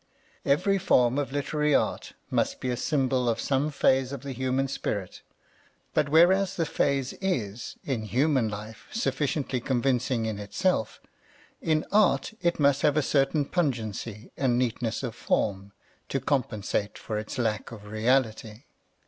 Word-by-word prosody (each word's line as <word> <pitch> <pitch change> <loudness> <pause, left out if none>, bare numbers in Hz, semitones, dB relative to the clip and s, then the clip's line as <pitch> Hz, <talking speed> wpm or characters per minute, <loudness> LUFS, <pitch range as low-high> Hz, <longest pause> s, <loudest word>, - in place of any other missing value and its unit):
Every 185 +8 +2
form 125 -7 +3
of 140 -2 -2
literary 150 +1 +1
art - - 0 0.2
must - - 0
be 130 - -2
a - - 0
symbol 130 -2 +1
of 115 0 0
some 140 +1 +1
phase 135 -2 +2
of 140 -2 -6
the 140 - -5
human 130 +1 0
spirit; 100 -7 -4 0.7
but 150 -2 +2
whereas 185 +5 +5
the 165 - 0
phase 140 -4 0
is, 115 - -2
in 120 -6 -2
human 130 0 +2
life, 105 +1 -8
sufficiently 135 - -1
convincing 125 -1 0
in 110 -2 -3
itself, 110 - -1 0.6
in 155 -1 +1
art 210 +2 +3
it 170 -2 +1
must 140 -1 +3
have 150 0 +3
a 155 - +3
certain 140 +1 +2
pungency 115 - -2
and 125 -3 +1
neatness 120 -1 -1
of 120 -3 -3
form, 100 -2 -1 0.4
to - - 0
compensate 105 -6 -1
for 110 -2 -4
its 110 +5 -6
lack 110 -3 -1
of 105 -3 -10
reality. 110 +1 0
130 Hz, 150 wpm, -27 LUFS, 115-145 Hz, 0.7 s, whereas